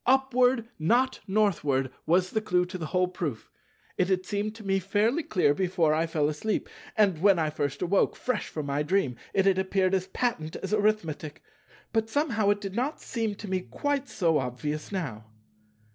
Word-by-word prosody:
"Upward, 255 -2 +3
not 245 +11 +2
Northward"—was 175 -3 +1
the 220 - 0
clue 180 -3 +2
to 185 +1 -7
the 160 - -4
whole 180 +1 +2
proof. 165 -10 -5 0.5
It 180 - +3
had 185 -1 0
seemed 210 +2 -2
to 220 -2 -11
me 195 0 +2
fairly 210 - +1
clear 180 - +2
before 175 -2 +1
I 160 +2 +1
fell 155 -2 +1
asleep; 155 +8 -2 0.3
and 195 -7 +3
when 200 -1 +5
I 155 -2 0
first 145 +1 -2
awoke, 190 +3 +2
fresh 255 - -2
from 155 -2 -5
my 140 +1 -1
dream, 150 -5 +1 0.2
it 195 -1 +2
had 190 -1 +4
appeared 190 0 +1
as 190 -1 +1
patent 190 -8 -2
as 195 +2 -4
Arithmetic; 200 -8 0 0.5
but 225 -1 +1
somehow 230 -7 +1
it 205 0 +2
did 195 -2 -5
not 265 +6 -1
seem 225 -4 -2
to 210 - -8
me 185 -1 0
quite 280 +7 -2
so 165 -5 +2
obvious 150 +6 -4
now. 135 - -4
190 Hz, 180 wpm, -28 LUFS, 160-215 Hz, 0.5 s, when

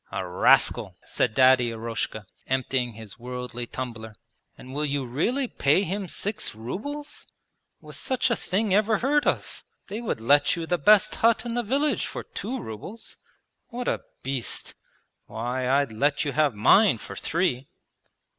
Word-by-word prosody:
'A 95 - -3
rascal!' 90 - +3
said 110 - -1
Daddy 130 -2 +5
Eroshka, 115 -2 -4 0.2
emptying 130 -2 -1
his 110 -1 -11
'worldly' 125 0 -6
tumbler. 115 -4 -6 0.4
'And 130 - -11
will 150 +2 -1
you 140 -2 -1
really 230 - 0
pay 150 -1 +2
him 195 +1 -3
six 205 - -3
rubles? 260 - -6 0.5
Was - - -9
such 260 -1 0
a - - +3
thing 200 +1 -1
ever 215 +2 +3
heard 290 +6 +1
of? - - -2 0.3
They 210 +4 -4
would 230 - -2
let 145 +7 +4
you 165 -1 -4
the 175 +1 0
best 210 +7 +5
hut 230 +1 +2
in 235 - -3
the 240 - 0
village 275 +7 0
for - - -6
two 250 +6 -5
rubles. 175 - -8 0.5
What 245 0 -5
a - - 0 0.2
beast! 130 -3 -3 0.5
Why, 125 +3 -3
I'd 140 -2 +2
let 145 +7 +1
you 145 - -1
have 145 -4 +2
mine 195 - +5
for - - -9
three!' 155 -7 -1
145 Hz, 155 wpm, -26 LUFS, -, 0.5 s, Daddy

